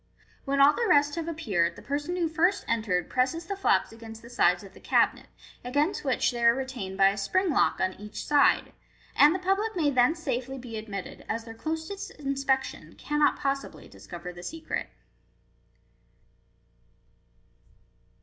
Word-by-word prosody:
When 275 Hz, 0 st, 0 dB
all 280 Hz, +2 st, +7 dB
the 470 Hz, -, -1 dB
rest 290 Hz, 0 st, +4 dB
have 330 Hz, 0 st, -4 dB
appeared, 210 Hz, -, 0 dB
the -, -, -13 dB
person 290 Hz, +5 st, -2 dB
who 345 Hz, -2 st, +1 dB
first 345 Hz, +4 st, +1 dB
entered 205 Hz, -7 st, 0 dB
presses 265 Hz, +7 st, 0 dB
the 400 Hz, -, -3 dB
flaps 390 Hz, -, +2 dB
against 225 Hz, 0 st, -11 dB
the 235 Hz, -, -12 dB
sides -, -, +3 dB
of -, -, -13 dB
the -, -, -15 dB
cabinet, -, -, +1 dB, 0.4 s
against 290 Hz, +10 st, 0 dB
which 265 Hz, -2 st, +1 dB
they 240 Hz, -1 st, -4 dB
are 235 Hz, 0 st, +6 dB
regained 255 Hz, -8 st, -5 dB
by 195 Hz, 0 st, +6 dB
a 200 Hz, -, -3 dB
spring 340 Hz, -, +1 dB
lock -, -, +2 dB
on 185 Hz, 0 st, 0 dB
each 210 Hz, +1 st, -7 dB
side, 290 Hz, -1 st, +3 dB, 0.4 s
and 300 Hz, +4 st, +6 dB
the -, -, +1 dB
public 390 Hz, +4 st, 0 dB
may 305 Hz, -5 st, +2 dB
then 255 Hz, +4 st, +3 dB
safely 265 Hz, -5 st, -3 dB
be 245 Hz, -3 st, -8 dB
admitted, 210 Hz, -3 st, -7 dB
as 230 Hz, +1 st, -2 dB
their 225 Hz, 0 st, -9 dB
closest 320 Hz, -, -5 dB
inspection 275 Hz, -2 st, -2 dB
cannot 295 Hz, 0 st, +1 dB
possibly 275 Hz, -1 st, -3 dB
discover 175 Hz, 0 st, -9 dB
the 175 Hz, -, -10 dB
secret. 320 Hz, -, -5 dB
275 Hz, 160 wpm, -27 LUFS, 225-320 Hz, 0.4 s, all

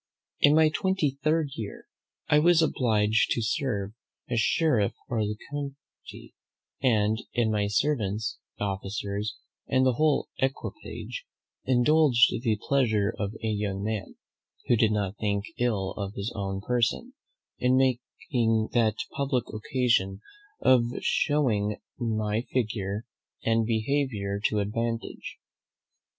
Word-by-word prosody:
In 145 Hz, +1 st, +6 dB
my 160 Hz, 0 st, +6 dB
twenty 155 Hz, -5 st, 0 dB
third 155 Hz, -1 st, +2 dB
year 110 Hz, -5 st, -7 dB, 0.4 s
I 150 Hz, -, +5 dB
was 170 Hz, +1 st, +5 dB
obliged 110 Hz, -7 st, +2 dB
to 115 Hz, -, -1 dB
serve 110 Hz, -4 st, -1 dB, 0.3 s
as 120 Hz, -2 st, 0 dB
sheriff 120 Hz, -5 st, +2 dB, 0.2 s
of 115 Hz, -, 0 dB
the 105 Hz, 0 st, -3 dB
county; 140 Hz, -1 st, -8 dB, 0.5 s
and 110 Hz, -3 st, +2 dB
in 115 Hz, -3 st, +2 dB
my 105 Hz, -1 st, +1 dB
servants, 105 Hz, -2 st, 0 dB, 0.2 s
officers, 100 Hz, +1 st, -3 dB, 0.3 s
and 130 Hz, +1 st, +3 dB
whole 145 Hz, +4 st, +2 dB
equipage, 300 Hz, -, -4 dB, 0.4 s
indulged 130 Hz, 0 st, +5 dB
the 115 Hz, -4 st, +1 dB
pleasure 110 Hz, -6 st, +2 dB
of 100 Hz, 0 st, -2 dB
a -, -, 0 dB
young 100 Hz, -2 st, -2 dB
man 105 Hz, -3 st, -3 dB, 0.5 s
(who 120 Hz, -, +4 dB
did 110 Hz, -1 st, +3 dB
not 105 Hz, -1 st, -1 dB
think 100 Hz, -1 st, 0 dB
ill 105 Hz, -6 st, 0 dB
of 100 Hz, 0 st, -5 dB
his 100 Hz, +4 st, -4 dB
own 95 Hz, -1 st, -3 dB
person) 120 Hz, +1 st, 0 dB, 0.5 s
in 125 Hz, +1 st, +3 dB, 0.4 s
taking 115 Hz, -6 st, +1 dB
that 110 Hz, -3 st, +3 dB, 0.2 s
public 135 Hz, -3 st, 0 dB
occasion 110 Hz, -4 st, +1 dB, 0.4 s
of 130 Hz, -2 st, +5 dB, 0.2 s
shewing 110 Hz, -9 st, +1 dB, 0.2 s
my 110 Hz, -2 st, 0 dB
figure 105 Hz, -3 st, -1 dB, 0.4 s
and 115 Hz, -1 st, +2 dB
behaviour 110 Hz, -4 st, -1 dB
to 105 Hz, -1 st, +2 dB
advantage. 115 Hz, +3 st, -3 dB
115 Hz, 120 wpm, -27 LUFS, 105-130 Hz, 0.5 s, In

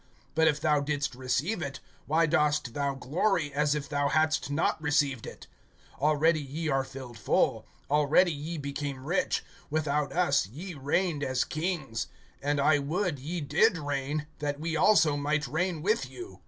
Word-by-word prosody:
But 160 Hz, 0 st, +4 dB
if 150 Hz, -2 st, +2 dB
thou 150 Hz, 0 st, +3 dB
didst 145 Hz, -2 st, -1 dB
receive 130 Hz, -, -1 dB
it, 140 Hz, -2 st, -4 dB, 0.3 s
why 160 Hz, +3 st, +3 dB
dost 150 Hz, -5 st, +1 dB
thou 140 Hz, 0 st, -1 dB
glory, 150 Hz, +3 st, 0 dB
as 145 Hz, +1 st, +2 dB
if 150 Hz, -2 st, -3 dB
thou 145 Hz, -1 st, 0 dB
hadst 155 Hz, 0 st, +1 dB
not 155 Hz, +2 st, 0 dB
received 145 Hz, -5 st, +1 dB
it? -, -, -10 dB, 0.6 s
(8)Already 155 Hz, +1 st, +3 dB
ye 155 Hz, +4 st, -4 dB
are 135 Hz, -1 st, +2 dB
filled 130 Hz, -4 st, -9 dB
full, -, -, +1 dB, 0.2 s
already 150 Hz, +5 st, +4 dB
ye 155 Hz, +3 st, -5 dB
became 140 Hz, -2 st, -4 dB
rich, 180 Hz, +4 st, 0 dB, 0.3 s
without 150 Hz, -2 st, 0 dB
us 145 Hz, -, +2 dB
ye 170 Hz, -, -8 dB
reigned 150 Hz, +2 st, 0 dB
as 130 Hz, -2 st, +1 dB
kings; 155 Hz, -8 st, -3 dB, 0.3 s
and 145 Hz, +1 st, 0 dB
I 150 Hz, +1 st, +4 dB
would 160 Hz, +2 st, -1 dB
ye 165 Hz, +6 st, -4 dB
did 175 Hz, +8 st, +3 dB
reign, 145 Hz, 0 st, -2 dB
that 145 Hz, -1 st, -2 dB
we 160 Hz, +1 st, -2 dB
also 160 Hz, -3 st, +5 dB
might 150 Hz, +1 st, 0 dB
reign 160 Hz, +3 st, -1 dB
with 215 Hz, +5 st, +1 dB
you. 365 Hz, 0 st, -10 dB
150 Hz, 165 wpm, -29 LUFS, 140-160 Hz, 0.6 s, also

